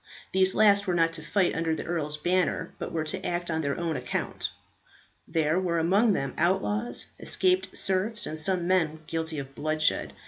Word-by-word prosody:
These 190 0 +3
last 200 -2 +5
were 180 - +1
not 165 -1 +3
to 160 - -4
fight 180 +3 +1
under 165 -1 0
the - - -5
earl's 150 -3 -2
banner, 180 +3 0
but - - -4
were 160 -1 -1
to 185 +5 -4
act 175 0 -2
on 160 0 0
their 140 0 -2
own 165 -2 -1
account. 125 -2 -3 0.8
There 160 +2 +1
were 175 -2 0
among 200 +7 +3
them 135 -7 -2
outlaws, 195 +6 +1
escaped 370 0 0
serfs, 195 +3 0
and 155 - -5
some 175 +2 0
men 165 -4 +1
guilty 160 0 -3
of 135 -1 -6
bloodshed. 155 +2 0
170 Hz, 180 wpm, -28 LUFS, 155-190 Hz, 0.8 s, last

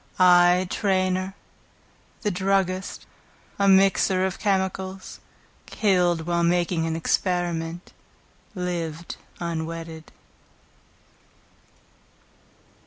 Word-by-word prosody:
I 180 0 +5
Trainor, 185 -1 0 0.9
the 210 - +1
druggist, 190 0 -1 0.5
a 200 - +3
miser 190 -1 +4
of 190 - -4
chemicals, 190 -1 -2 0.5
Killed 180 -5 +1
while 170 0 0
making 170 -1 +1
an 160 - -2
experiment, 170 0 -2 0.6
Lived 170 -3 -4 0.2
unwedded. 165 -1 -5
180 Hz, 70 wpm, -24 LUFS, 170-190 Hz, 0.9 s, I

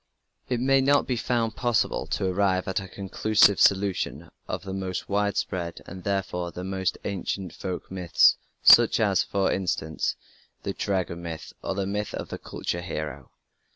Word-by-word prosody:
It 125 -2 0
may 135 +2 +4
not 140 +2 +3
be 125 - -1
found 115 -1 -1
possible 120 -3 0
to - - -1
arrive 95 0 +1
at 95 - 0
a 95 - -7
conclusive 100 +1 +3
solution 95 -5 +2 0.2
of - - -4
the 95 -1 -6
most 95 -1 -4
widespread, 100 -4 -1
and 95 0 -9
therefore 95 -3 -2
the 90 - -7
most 95 -1 -1
ancient 95 -1 -3
folk 90 -1 -6
myths, 90 -3 +4 0.3
such - - +8
as, - - +3
for 95 -1 0
instance, 85 -4 -1 0.5
the - - -2
Dragon 95 -3 -2
Myth, 80 -5 -7
or 95 - -3
the 100 0 -1
myth 105 +1 -3
of - - -6
the - - -6
culture 85 - -4
hero. 75 -6 -5
95 Hz, 160 wpm, -26 LUFS, 90-100 Hz, 0.5 s, such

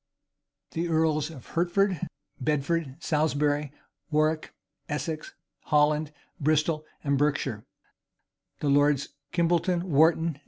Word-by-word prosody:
The 170 +1 -2
earls 160 -2 +1
of 140 -7 -11
Hertford, 180 +1 +1 0.3
Bedford, 150 +1 0
Salisbury, 150 -2 +1 0.4
Warwick, 155 0 +1 0.4
Essex, 155 +1 -4 0.3
Holland, 150 0 +2 0.3
Bristol, 155 +1 +1 0.2
and 140 -2 +1
Berkshire, 140 -7 0 1.0
the 145 - +1
lords 145 0 +3 0.2
Kimbolton, 175 0 +2
Wharton. 160 -1 +3
155 Hz, 90 wpm, -27 LUFS, 145-165 Hz, 1.0 s, lords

